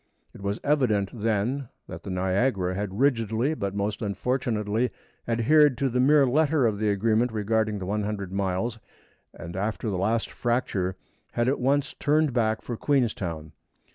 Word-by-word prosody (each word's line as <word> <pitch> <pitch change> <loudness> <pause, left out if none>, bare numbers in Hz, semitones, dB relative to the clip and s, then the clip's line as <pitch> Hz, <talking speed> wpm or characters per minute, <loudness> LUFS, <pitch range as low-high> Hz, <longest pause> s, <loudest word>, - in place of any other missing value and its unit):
It - - -12
was 100 +2 -2
evident 120 -10 +2
then 115 +4 -1 0.2
that - - -8
the - - -8
Niagara 95 +1 0
had 100 +1 -4
rigidly, 120 0 +2
but 100 -9 -3
most 100 +1 -2
unfortunately, 110 +1 -1 0.4
adhered 130 +4 +4
to 135 +1 +1
the 125 +1 -1
mere 140 +2 +5
letter 145 +1 +2
of 105 -3 0
the 105 -1 +1
agreement 110 +4 +2
regarding 110 0 0
the 95 - -5
100 105 -1 -2
miles, 100 +4 -1 0.5
and 85 +2 -9
after 105 +3 -2
the 95 - -2
last 110 +4 0
fracture 105 -6 -1 0.4
had 120 +1 +1
at 135 - +1
once 140 +3 +1
turned 150 -1 +1
back 110 -2 +1
for 120 - -4
Queenstown. 100 - -1
110 Hz, 155 wpm, -26 LUFS, 100-125 Hz, 0.5 s, mere